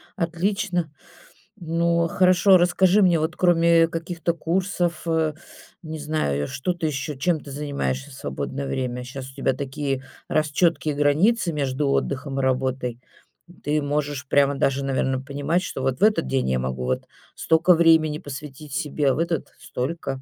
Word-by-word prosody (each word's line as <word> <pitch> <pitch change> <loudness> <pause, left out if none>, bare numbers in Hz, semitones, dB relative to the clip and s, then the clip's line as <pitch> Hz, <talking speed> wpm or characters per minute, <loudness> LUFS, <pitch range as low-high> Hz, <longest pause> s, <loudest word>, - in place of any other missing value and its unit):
отлично. 180 -1 -1 0.7
Ну, 170 -1 +1
хорошо, 185 +2 +5
расскажи 180 +3 +3
мне, 175 -3 +4
вот 160 +2 -2
кроме 170 -2 +4
каких-то 170 +1 -3
курсов, 175 0 -1
э, 160 -2 +1 0.5
не 155 -1 -6
знаю, 145 - -1
что 140 +6 -2
ты 170 -2 -2
ещё 145 +1 -3
чем 160 +5 0
ты 140 - -10
занимаешься 140 -1 -3
в - - -13
свободное 135 +1 -4
время? 125 -2 -3
Щас 130 +1 -8
у - - -20
тебя 135 -1 0
такие, 135 0 -3 0.3
раз, 155 -1 +1
чёткие 160 -1 +1
границы 170 +7 +2
между 140 -1 -1
отдыхом 135 0 -1
и 135 - -1
работой. 130 -2 -1 0.6
Ты 150 +1 +1
можешь 145 -1 -2
прямо 140 +1 +3
даже, 135 0 0
наверно, 130 -1 0
понимать, 145 +5 -1
что 135 - -5
вот 130 +1 -1
в - - 0
этот 210 -6 +4
день 130 - 0
я 65 - +1
могу 65 0 -3
вот 65 0 -1 0.3
стока 165 +3 +4
времени 160 -2 +4
посвятить 145 +1 -9
себе, 145 0 0
а - - +1
в - - -3
этот- 165 -2 -2
столько. 135 0 -4
150 Hz, 160 wpm, -23 LUFS, 135-170 Hz, 0.7 s, хорошо